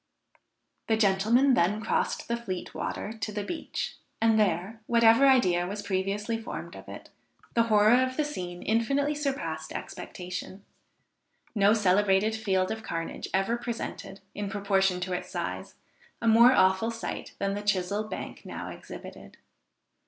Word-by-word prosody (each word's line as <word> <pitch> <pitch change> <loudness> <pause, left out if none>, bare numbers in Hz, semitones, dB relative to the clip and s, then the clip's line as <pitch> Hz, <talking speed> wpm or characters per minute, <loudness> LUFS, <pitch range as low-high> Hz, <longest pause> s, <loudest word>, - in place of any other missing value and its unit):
The 220 - +2
gentlemen 220 +6 +4
then 205 -1 +2
crossed 220 - -1
the 235 - 0
Fleet 195 -7 -5
water 215 - -4
to 220 -1 -4
the 205 0 -3
beach, 320 +10 -4 0.2
and 225 -1 +4
there, 200 +3 0
whatever 230 +3 +6
idea 180 -10 +4
was 205 +2 -5
previously 200 +4 -1
formed 225 - -7
of - - -11
it, - - -10 0.4
the 230 -1 +3
horror 215 +4 +5
of 255 0 -1
the 305 - +1
scene 180 -11 -6
infinitely 275 +7 +1
surpassed 290 -1 -3
expectation; 180 +2 -7 0.9
no 205 0 +4
celebrated 205 +1 +3
field 190 -4 0
of 220 - -4
carnage 165 -6 -4
ever 195 +5 +1
presented, 235 -4 -6
in 205 -1 -4
proportion 195 -3 +1
to 185 0 -2
its 180 - -4
size, - - -5 0.4
a 230 - -2
more 235 +2 +7
awful 190 -1 +3
sight 230 0 -6
than 195 0 -1
the 205 - -3
Chisell 205 +1 0
Bank - - -6
now - - -6
exhibited. - - -10
210 Hz, 145 wpm, -28 LUFS, 190-230 Hz, 0.9 s, more